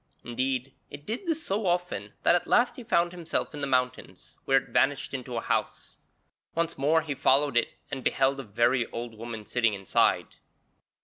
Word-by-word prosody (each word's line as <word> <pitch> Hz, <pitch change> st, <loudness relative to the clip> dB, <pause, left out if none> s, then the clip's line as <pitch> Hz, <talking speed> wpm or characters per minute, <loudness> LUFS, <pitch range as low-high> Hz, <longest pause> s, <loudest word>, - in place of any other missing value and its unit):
Indeed, 130 Hz, +2 st, -2 dB, 0.2 s
it 145 Hz, 0 st, -10 dB
did 240 Hz, -, -4 dB
this 325 Hz, -1 st, 0 dB
so 200 Hz, +1 st, -1 dB
often 175 Hz, -, -1 dB
that -, -, +5 dB
at 175 Hz, -, +1 dB
last 240 Hz, 0 st, +3 dB
he 250 Hz, -, -8 dB
found 175 Hz, -7 st, +2 dB
himself 170 Hz, -3 st, -2 dB
in 145 Hz, -, -6 dB
the 140 Hz, -, -1 dB
mountains, 125 Hz, -1 st, -2 dB
where 135 Hz, -, +4 dB
it -, -, -1 dB
vanished 140 Hz, 0 st, +1 dB
into 125 Hz, -2 st, -4 dB
a -, -, -1 dB
house. -, -, -2 dB, 0.6 s
Once 170 Hz, 0 st, 0 dB
more 155 Hz, +4 st, +2 dB
he 150 Hz, -2 st, -3 dB
followed 140 Hz, 0 st, +3 dB
it 120 Hz, -, +1 dB, 0.2 s
and 135 Hz, -1 st, -4 dB
beheld 135 Hz, +1 st, +2 dB
a -, -, -4 dB
very 120 Hz, +3 st, +1 dB
old 120 Hz, 0 st, -6 dB
woman 110 Hz, -1 st, -7 dB
sitting 115 Hz, -3 st, +1 dB
inside. 95 Hz, -1 st, +1 dB
135 Hz, 185 wpm, -28 LUFS, 120-170 Hz, 0.6 s, that